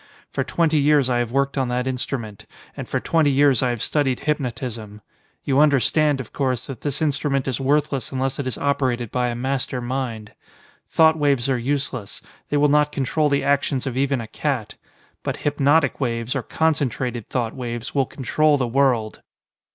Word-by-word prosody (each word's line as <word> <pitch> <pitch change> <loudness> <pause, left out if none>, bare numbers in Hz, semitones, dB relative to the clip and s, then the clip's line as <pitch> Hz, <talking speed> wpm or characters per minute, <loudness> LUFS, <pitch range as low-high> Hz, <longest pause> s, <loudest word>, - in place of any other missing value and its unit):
For - - -1
twenty 160 -2 +1
years 145 -3 +3
I 120 - +2
have 120 -1 -2
worked 140 +1 0
on 130 - 0
that 125 +1 -1
instrument, 125 -5 -4 0.3
and - - -7
for - - 0
twenty 160 -3 +2
years 140 -2 +4
I 130 - +2
have 120 -3 -2
studied 135 -4 0
hypnotism. 120 -7 -3 0.4
You 135 -1 +2
understand, 150 0 +3
of 130 - -8
course, 130 -3 -1
that 135 -5 -8
this 145 +1 -2
instrument 140 -2 0
is 130 -1 -2
worthless 140 -2 0
unless 135 0 -2
it 140 - -2
is 130 - -3
operated 130 -5 0
by 125 -1 0
a 120 - -2
master 130 +1 -2
mind. 120 -4 -4 0.6
Thought 160 -1 +4
waves 140 -3 +2
are 130 - +1
useless; 135 -5 -3 0.3
they 145 - +1
will 145 +1 +4
not 150 0 +3
control 150 +2 0
the 140 0 +1
actions 140 -2 +1
of 130 -2 -3
even 135 0 +1
a 115 - -7
cat. 130 -4 -2 0.5
But - - -3
hypnotic 145 +2 +2
waves 115 -1 -1
or 135 - 0
concentrated 125 -7 -1
thought 120 -3 -1
waves 120 -2 -5
will 135 -3 +1
control 150 +3 +1
the 130 - 0
world." 120 -4 +1
135 Hz, 180 wpm, -22 LUFS, 125-145 Hz, 0.6 s, years